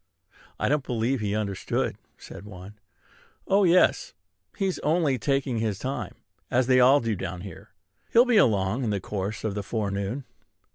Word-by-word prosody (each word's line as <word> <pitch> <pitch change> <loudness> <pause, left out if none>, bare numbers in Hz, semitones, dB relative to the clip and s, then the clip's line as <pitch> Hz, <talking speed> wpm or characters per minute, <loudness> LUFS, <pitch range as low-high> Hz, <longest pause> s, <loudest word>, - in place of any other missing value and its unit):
"I - - 0
don't 145 -1 +1
believe 125 +2 -1
he 105 -1 -2
understood," 100 -3 -2 0.2
said - - -11
one. 100 +1 -11 0.7
"Oh, 200 +1 +4
yes! 180 - +3 0.4
He's 190 -2 -1
only 150 -4 +1
taking 135 -2 0
his 110 -3 -1
time, 120 -4 -4 0.3
as 125 +1 +2
they 130 0 +4
all 130 +3 +6
do 115 -2 -1
down 90 -1 -5
here. 95 -3 -10 0.4
He'll 235 +2 +6
be 245 -3 +3
along 110 - +2
in 115 - -1
the 100 -1 0
course 100 +2 -4
of 110 - -1
the 105 - -3
forenoon." 100 +4 -3
115 Hz, 160 wpm, -26 LUFS, 100-135 Hz, 0.7 s, all